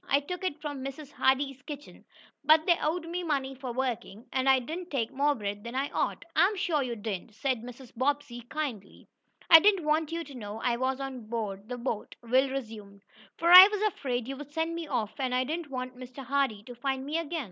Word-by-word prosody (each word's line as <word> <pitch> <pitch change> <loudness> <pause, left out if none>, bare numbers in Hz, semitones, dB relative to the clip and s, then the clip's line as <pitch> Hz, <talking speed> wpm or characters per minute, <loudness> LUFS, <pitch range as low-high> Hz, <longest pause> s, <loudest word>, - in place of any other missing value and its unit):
"I 280 - +4
took 360 +6 -6
it 325 -5 -2
from 290 -3 -5
Mrs. 275 +1 -7
Hardee's 270 0 +1
kitchen, 290 +1 -10 0.4
but 310 +2 +5
they 345 - +5
owed 330 +2 -1
me 350 +2 -3
money 280 -5 -1
for 260 -1 -6
working, 240 -3 -3
and 265 0 +2
I 265 - +7
didn't 325 +8 -5
take 235 -6 -1
more 290 +2 +2
bread 205 -2 -5
than 235 +1 -7
I 275 +2 -1
ought." - - -2
"I'm 405 +3 +4
sure 345 -6 +1
you 245 -3 -2
didn't," 210 -1 -5
said 255 +1 -1
Mrs. 245 +1 -11
Bobbsey, 270 -1 -1
kindly. 275 -10 -5 0.4
"I 325 - +11
didn't 390 -3 +3
want 310 +1 +1
you 335 0 -2
to 285 - -12
know 215 -3 -7
I 240 -1 +2
was 260 +2 -1
on 260 -5 -6
board 215 -2 -4
the 250 - -4
boat," 235 -3 -4
Will 260 +3 +3
resumed, 215 -6 -7 0.3
"for 340 +1 +2
I 365 +2 +13
was 420 0 -2
afraid 250 - -1
you'd 275 +2 -7
send 320 +2 -1
me 335 -1 -5
off, 240 -6 -3
and 255 -2 0
I 255 - +2
didn't 315 +3 -4
want 255 -1 -5
Mr. 255 +1 -9
Hardee 265 -6 0
to 245 - -10
find 265 +2 -3
me 305 +3 -1
again. 335 0 -3
270 Hz, 215 wpm, -29 LUFS, 245-305 Hz, 0.4 s, I